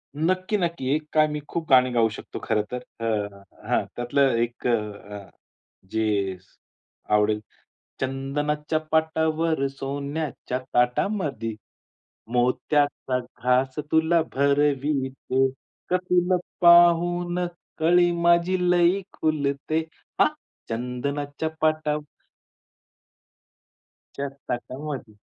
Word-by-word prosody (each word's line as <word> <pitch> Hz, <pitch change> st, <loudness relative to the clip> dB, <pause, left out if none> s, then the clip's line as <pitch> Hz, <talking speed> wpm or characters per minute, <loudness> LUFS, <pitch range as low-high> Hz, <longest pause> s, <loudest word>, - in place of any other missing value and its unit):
नक्की, 185 Hz, +6 st, 0 dB
नक्की. 170 Hz, -7 st, -2 dB
एक 155 Hz, 0 st, -4 dB
काय 155 Hz, 0 st, +5 dB
मी 150 Hz, 0 st, -3 dB
खूप 165 Hz, -1 st, -3 dB
गाणी 130 Hz, -1 st, +6 dB
गाऊ 115 Hz, -2 st, +3 dB
शकतो -, -, -8 dB
खरं 105 Hz, -, +1 dB
तर, 125 Hz, 0 st, -4 dB, 0.2 s
अ, 105 Hz, -3 st, -2 dB, 0.3 s
हां, -, -, +2 dB
त्यातलं 130 Hz, +1 st, +2 dB
एक 120 Hz, +1 st, -4 dB
अ, 120 Hz, -, +4 dB, 0.4 s
हं, 100 Hz, -2 st, -9 dB, 0.6 s
जे 105 Hz, -4 st, 0 dB, 0.8 s
आवडेल. 105 Hz, 0 st, +2 dB, 0.6 s
चंदनाच्या 145 Hz, +3 st, -1 dB
पाटावर 160 Hz, -1 st, +1 dB
सोन्याच्या 140 Hz, 0 st, -4 dB, 0.2 s
ताटामधी, 125 Hz, -, 0 dB, 0.8 s
मोत्याचा 130 Hz, +2 st, +1 dB
घास 125 Hz, +2 st, 0 dB
तुला 160 Hz, +1 st, +4 dB
भरविते. 140 Hz, -1 st, +1 dB, 0.4 s
गं, 180 Hz, -, +5 dB
तुला 180 Hz, +1 st, +3 dB, 0.2 s
पाहून 175 Hz, +1 st, +5 dB, 0.3 s
कळी 175 Hz, +2 st, +4 dB
माझी 170 Hz, +2 st, +4 dB
लई 175 Hz, +2 st, +4 dB, 0.2 s
खुलते. 150 Hz, 0 st, 0 dB, 0.4 s
हां. -, -, +7 dB, 0.4 s
चंदनाच्या 140 Hz, +6 st, -3 dB
पाटावर 155 Hz, -1 st, +1 dB, 2.1 s
सोन्याच्या 140 Hz, 0 st, -2 dB, 0.3 s
ताटामधी. 130 Hz, -1 st, -6 dB
145 Hz, 95 wpm, -25 LUFS, 125-160 Hz, 2.1 s, हां